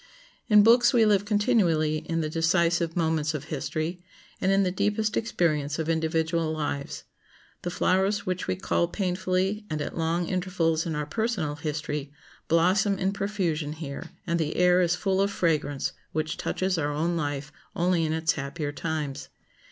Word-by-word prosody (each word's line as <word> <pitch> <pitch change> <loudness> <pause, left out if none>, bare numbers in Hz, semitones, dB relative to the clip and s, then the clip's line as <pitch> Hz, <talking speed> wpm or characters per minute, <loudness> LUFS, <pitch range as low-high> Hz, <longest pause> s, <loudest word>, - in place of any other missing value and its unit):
In 210 -1 +7
books 240 +4 +6
we 230 -3 +5
live 205 -2 +3
continually 200 -8 +2
in 165 +1 -2
the 155 - -1
decisive 170 +1 +1
moments 160 -2 0
of 145 - -4
history, 155 +3 -3 0.4
and 190 - +2
in 195 0 +4
the 180 - +1
deepest 210 +3 0
experience 155 -9 0
of 160 0 -2
individual 160 0 0
lives. 145 -2 -3 0.6
The 175 - -3
flowers 190 +3 +1
which 185 -1 -2
we - - 0
cull 180 -2 0
painfully 185 +2 -1
and 155 - -2
at - - -4
long 165 +1 0
intervals 175 -3 0
in 160 - -2
our 150 0 -2
personal 210 -4 -1
history 150 -1 -3 0.4
blossom 185 +5 +3
in 190 +1 0
profusion 180 -7 -2
here, 155 -3 -7 0.2
and 170 0 0
the 155 -1 -1
air 180 0 +4
is 175 0 +2
full 190 0 0
of 200 - +2
fragrance 155 -7 0 0.2
which 155 0 -1
touches 185 -2 -1
our 145 -1 0
own 165 +4 0
life 145 -2 -3 0.2
only 175 -1 +2
in 155 - 0
its 160 -1 +1
happier 145 +1 -4
times. 150 -2 -4
170 Hz, 165 wpm, -27 LUFS, 155-190 Hz, 0.6 s, In